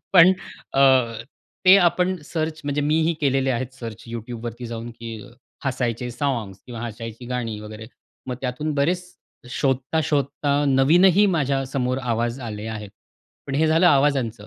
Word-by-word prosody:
पण 180 +1 +9 0.4
अ, 135 - +4 0.8
ते 185 +1 +10
आपण 180 +1 +2
सर्च 155 0 -3
म्हणजे 145 0 -1
मीही 155 +3 +2
केलेले 135 -2 +2
आहेत 130 +1 -3
सर्च 115 -5 -8
YouTubeवरती 120 +1 -6
जाऊन 115 0 -6
की 115 0 -7 0.5
हसायचे 120 0 -2
साँग्स 120 -8 -2
किंवा 120 -2 -7
हसायची 115 +1 -8
गाणी 120 -3 -3
वगैरे 105 +1 -9 0.4
मग 125 - -2
त्यातून 135 +4 -2
बरेच 170 +6 +1 0.5
शोधता-शोधता 140 +2 0 0.2
नवीनही 170 +9 +5
माझ्यासमोर 135 -4 0
आवाज 120 -1 -1
आले 110 -3 -6
आहेत. 105 -2 -6 0.6
पण 135 - -4
हे 155 +3 +3
झालं 160 +3 +4
आवाजांचं. 135 -8 +2
130 Hz, 135 wpm, -23 LUFS, 115-150 Hz, 0.8 s, ते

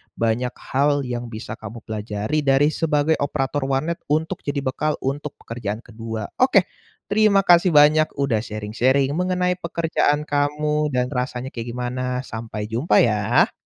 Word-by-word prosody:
banyak 115 +2 0 0.2
hal 145 +1 +2
yang 120 -1 -4
bisa 110 0 -7
kamu 110 +1 -9
pelajari 110 +5 -2
dari 145 +1 +3
sebagai 155 -1 +1
operator 140 -1 -1
warnet 145 +5 -1
untuk 155 +2 0
jadi 145 0 -3
bekal 150 +3 -1
untuk 145 +2 -3
pekerjaan 110 -2 -4
ke-2. 115 -1 -6 0.2
Oke, 235 -8 +4 0.4
terima 205 -2 +4
kasih 175 0 +5
banyak 150 +1 +5
udah 140 -6 +1
sharing-sharing 115 +6 0
mengenai 180 +2 0
pekerjaan 160 -3 0
kamu 150 +1 0
dan 125 0 0
rasanya 125 0 -3
kayak 115 0 -6
gimana, 125 +1 -2
sampai 110 -3 -6
jumpa 115 +9 0
ya. 105 0 +2
135 Hz, 140 wpm, -22 LUFS, 115-150 Hz, 0.4 s, kasih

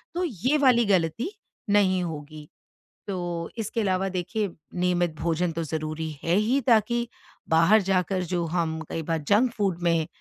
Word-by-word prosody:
तो 360 - 0
ये 255 - 0
वाली 245 -4 +5
गलती 195 - +1 0.4
नहीं 190 -3 +3
होगी। 155 -2 -7 0.6
तो 175 -3 -3
इसके 225 +1 -2
अलावा 190 -1 +1
देखिए 190 +3 -2 0.3
नियमित 175 -2 +1
भोजन 170 +1 0
तो 165 +1 -2
ज़रूरी 155 0 -3
है 170 +2 +2
ही 235 +6 +2
ताकि 235 +1 +3 0.4
बाहर 165 +7 +5
जाकर 185 -1 0
जो 175 -1 0
हम 160 -1 -1
कई 165 - -3
बार 165 0 -1
जंक 230 +5 +4
फ़ूड 195 -6 -1
में 165 -2 +2
180 Hz, 155 wpm, -26 LUFS, 165-215 Hz, 0.6 s, वाली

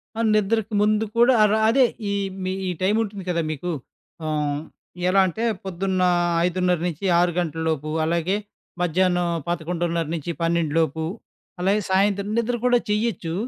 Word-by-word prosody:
ఆ! - - -5 0.2
నిద్రకు 215 +1 0
ముందు 215 +1 +2
కూడా 240 +2 +6
అర 210 - +4 0.2
అదే, 255 +3 +5 0.3
ఈ - - 0 0.3
మీ 185 - -1 0.2
ఈ - - 0
టైముంటుంది 205 0 0
కదా 170 -1 +1
మీకు. 165 +4 -4 0.5
ఆహ్, 150 -1 -1 0.5
ఎలాంటే, 190 +3 +2 0.2
పొద్దున్న 190 0 -2 0.5
5:30-6 180 0 +1
గంటలలోపు 160 -2 -2 0.2
అలాగే, 170 +4 0 0.4
మధ్యాహ్నం 180 +1 +2 0.2
11:30-12 170 -1 -1
లోపు. 160 0 0 0.6
అలాగే, 200 +3 +2
సాయంత్రం 200 +1 +2
నిద్ర 235 +1 0
కూడా 245 -1 +4
చేయొచ్చు. 210 -6 -1
180 Hz, 115 wpm, -23 LUFS, 165-205 Hz, 0.6 s, కూడా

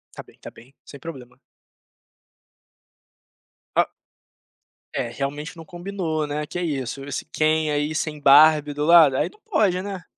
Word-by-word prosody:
Tá - - -7
bem, - - -22
tá - - -10
bem, 130 +4 -18
sem 140 - -12
problema. 130 -5 -10 2.4
Oh - - +4 1.1
É, - - -1
realmente 145 +8 -5
não 165 - -10
combinou, 175 -4 -4
né. 150 +1 -3
Que 175 +4 -5
isso? 135 -5 -3
Esse 145 - -5
Ken 155 0 0
aí 150 +1 -1
sem 155 -1 -3
Barbie 150 +1 +6
do 145 +1 -1
lado, 160 -5 +7
aí - - +1
não 425 - -23
pode, 205 - +1
né. 195 -2 -6
155 Hz, 145 wpm, -23 LUFS, 145-170 Hz, 2.4 s, lado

